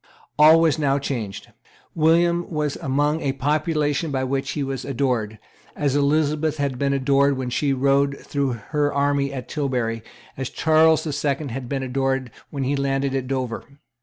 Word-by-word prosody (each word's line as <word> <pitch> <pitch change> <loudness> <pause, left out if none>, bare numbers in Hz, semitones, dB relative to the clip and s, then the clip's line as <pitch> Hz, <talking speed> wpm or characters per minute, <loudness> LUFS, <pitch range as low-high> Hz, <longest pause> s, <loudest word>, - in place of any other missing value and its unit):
All 155 +2 +8
was 160 -2 +2
now 140 -2 +2
changed. 115 -7 -5 0.4
William 170 +2 +2
was 150 -3 -2
among 145 +4 0
a 135 - -1
population 150 +2 0
by 135 -2 -1
which 135 +1 -2
he 145 - -2
was 135 -1 -4
adored, 120 -5 -1 0.4
as 145 -2 0
Elizabeth 150 +1 +1
had 140 -3 -2
been 140 -1 +1
adored 140 0 +2
when 130 -1 -3
she 140 +3 0
rode 140 +1 +2
through 140 -3 -2 0.2
her 145 -1 +2
army 140 0 +1
at 130 -4 -6
Tilbury, 125 -6 -2 0.4
as 135 -1 -3
Charles 160 0 +3
the 155 - -3
Second 145 0 -1
had 125 0 -6
been 135 -1 -2
adored 135 -1 -1 0.2
when 140 -2 -4
he 135 +2 0
landed 135 0 -1
at 130 -2 -2
Dover. 130 -3 -3
140 Hz, 165 wpm, -22 LUFS, 135-150 Hz, 0.4 s, All